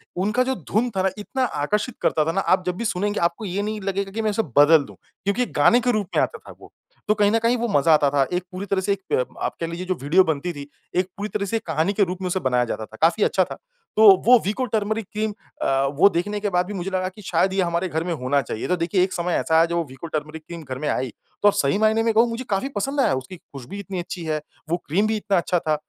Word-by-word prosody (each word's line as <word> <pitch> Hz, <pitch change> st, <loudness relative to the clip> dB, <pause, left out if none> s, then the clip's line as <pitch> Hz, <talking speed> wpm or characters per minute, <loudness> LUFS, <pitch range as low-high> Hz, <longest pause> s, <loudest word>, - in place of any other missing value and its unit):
उनका 210 Hz, +7 st, +1 dB
जो 265 Hz, +1 st, -1 dB, 0.2 s
धुन 230 Hz, +5 st, +2 dB
था 190 Hz, -, +1 dB
ना 190 Hz, -, +3 dB
इतना 255 Hz, +5 st, -2 dB, 0.2 s
आकर्षित 210 Hz, -, -1 dB
करता 155 Hz, -, +2 dB
था 165 Hz, -, +1 dB
ना, 195 Hz, +3 st, 0 dB
आप 185 Hz, -1 st, +2 dB
जब 180 Hz, -, -1 dB
भी 235 Hz, -, -3 dB
सुनेंगे 205 Hz, 0 st, -1 dB
आपको 170 Hz, +5 st, -1 dB
ये 195 Hz, +1 st, -2 dB
नहीं 215 Hz, +1 st, -3 dB
लगेगा 195 Hz, 0 st, -2 dB
कि 225 Hz, +3 st, -3 dB
मैं 215 Hz, -, +1 dB
उसे 210 Hz, -, +1 dB, 0.2 s
बदल 145 Hz, +1 st, +7 dB
दूँ, -, -, -13 dB, 0.3 s
क्योंकि 200 Hz, +6 st, +1 dB
गाने 240 Hz, -, +6 dB
के 245 Hz, +1 st, +2 dB
रूप 215 Hz, -4 st, -1 dB
में -, -, +4 dB
आता -, -, -3 dB
था -, -, -14 dB
वो। -, -, -15 dB, 0.4 s
तो 210 Hz, -, +4 dB
कहीं 205 Hz, -1 st, +3 dB
न 225 Hz, -, +3 dB
कहीं 235 Hz, +2 st, +3 dB
वो 235 Hz, 0 st, -1 dB
मज़ा 160 Hz, -5 st, +4 dB
आता 150 Hz, -2 st, +4 dB
था, 140 Hz, 0 st, +2 dB
एक 180 Hz, 0 st, 0 dB
पूरी 185 Hz, +2 st, -5 dB
तरह 195 Hz, -1 st, 0 dB
से 200 Hz, -, -1 dB
एक 200 Hz, -, -6 dB
प 125 Hz, -, +2 dB, 0.2 s
आप -, -, -2 dB
कह 165 Hz, -, -2 dB
लीजिए 170 Hz, +2 st, -5 dB
जो 185 Hz, -, 0 dB
वीडियो 160 Hz, +7 st, +4 dB
बनती 160 Hz, +1 st, -2 dB
थी, 140 Hz, -2 st, -8 dB, 0.3 s
एक 180 Hz, 0 st, +2 dB
पूरी 205 Hz, +1 st, -4 dB
तरह 205 Hz, -1 st, -2 dB
से 200 Hz, -, -3 dB
एक -, -, -8 dB
कहानी 160 Hz, +4 st, 0 dB
के 205 Hz, -, +3 dB
रूप 185 Hz, 0 st, -3 dB
में 185 Hz, -, -2 dB
उसे 180 Hz, +1 st, 0 dB
बनाया 125 Hz, -5 st, +1 dB
जाता 110 Hz, -2 st, -4 dB
था, 110 Hz, -, -15 dB
काफ़ी 165 Hz, +6 st, +3 dB
अच्छा 190 Hz, -, +3 dB
था, -, -, -7 dB, 0.4 s
तो 220 Hz, -, +4 dB, 0.2 s
वो 250 Hz, +2 st, +8 dB
वीको 215 Hz, +6 st, -1 dB
टर्मेरिक 220 Hz, -1 st, -1 dB
क्रीम 215 Hz, 0 st, -1 dB, 0.3 s
अ, -, -, -1 dB, 0.3 s
वो 200 Hz, -, +7 dB
देखने 205 Hz, +3 st, -2 dB
के 205 Hz, 0 st, -1 dB
बाद 180 Hz, -1 st, +1 dB
भी 205 Hz, -, -5 dB
मुझे 190 Hz, -1 st, -3 dB
लगा 185 Hz, 0 st, -1 dB
कि 190 Hz, +3 st, -14 dB
शायद 190 Hz, 0 st, +1 dB
ये 195 Hz, -, +2 dB
हमारे 170 Hz, +1 st, -1 dB
घर 160 Hz, 0 st, -1 dB
में 175 Hz, 0 st, -2 dB
होना 140 Hz, -1 st, 0 dB
चाहिए। 115 Hz, -3 st, -5 dB
तो 180 Hz, -, +2 dB
देखिए, 175 Hz, +2 st, +1 dB
एक 185 Hz, 0 st, -2 dB
समय 175 Hz, 0 st, -1 dB
ऐसा 160 Hz, -, +1 dB
आया, 165 Hz, +1 st, +6 dB
जब 170 Hz, 0 st, -3 dB
वो 170 Hz, -, +1 dB
वीको 135 Hz, +6 st, -9 dB
टर्मेरिक 155 Hz, 0 st, -5 dB
क्रीम 170 Hz, -1 st, -8 dB
घर 130 Hz, -3 st, -6 dB
में 150 Hz, -, -3 dB
आई, 130 Hz, -1 st, -1 dB, 0.3 s
तो 205 Hz, -, +7 dB
सही 140 Hz, -2 st, +1 dB
मायने 220 Hz, +1 st, +3 dB
में 225 Hz, -1 st, +2 dB
कहूँ 225 Hz, +2 st, +5 dB
मुझे 230 Hz, +2 st, -4 dB
काफ़ी 200 Hz, +7 st, 0 dB
पसंद 275 Hz, +8 st, -2 dB
आया, 140 Hz, -, +3 dB
उसकी 130 Hz, +8 st, -5 dB
खुशबू 140 Hz, +4 st, -10 dB
इतनी 195 Hz, -2 st, -5 dB
अच्छी 175 Hz, 0 st, -6 dB
है, 155 Hz, -1 st, -1 dB, 0.3 s
वो 170 Hz, -, +1 dB
क्रीम 195 Hz, +8 st, +2 dB
भी 220 Hz, 0 st, 0 dB
इतना 205 Hz, -2 st, 0 dB
अच्छा 175 Hz, +1 st, +1 dB
था। 155 Hz, -2 st, 0 dB
185 Hz, 285 wpm, -23 LUFS, 165-210 Hz, 0.4 s, वो